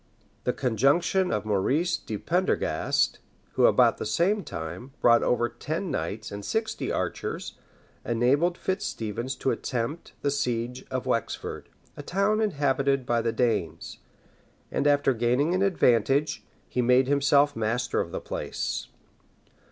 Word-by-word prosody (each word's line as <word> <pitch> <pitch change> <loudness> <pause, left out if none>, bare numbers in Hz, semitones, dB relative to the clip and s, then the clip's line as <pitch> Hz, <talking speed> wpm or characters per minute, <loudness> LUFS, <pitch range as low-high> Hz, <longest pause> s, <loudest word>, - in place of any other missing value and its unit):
The - - +3
conjunction 140 - +2
of 105 0 -1
Maurice 135 - +1
de 110 -9 -5
Prendergast, 180 - 0 0.3
who, - - +4
about - - +4
the - - -3
same 185 - +1
time, 90 +12 -7
brought 120 0 +5
over 120 -1 +2
ten 155 - -4
knights 110 +1 -4
and 100 0 -6
sixty 220 - -2
archers, - - -3 0.4
enabled 140 +9 +2
Fitz 190 - -2
Stephens 115 +4 -3
to 130 - 0
attempt 125 +6 -3
the 140 - +2
siege 125 -2 -2
of 130 -1 -3
Wexford, 115 -4 -3 0.3
a - - -7
town 200 +4 +1
inhabited 140 - +1
by 120 -1 +1
the 115 - 0
Danes; 110 -9 -1 0.7
and 145 - +1
after 145 -2 +3
gaining 125 +8 +1
an 185 - +1
advantage, 140 - +2 0.2
he 125 - -1
made 125 +2 +4
himself 145 +1 +3
master 115 +3 0
of - - -5
the - - -3
place. - - -4
130 Hz, 135 wpm, -27 LUFS, 115-155 Hz, 0.7 s, brought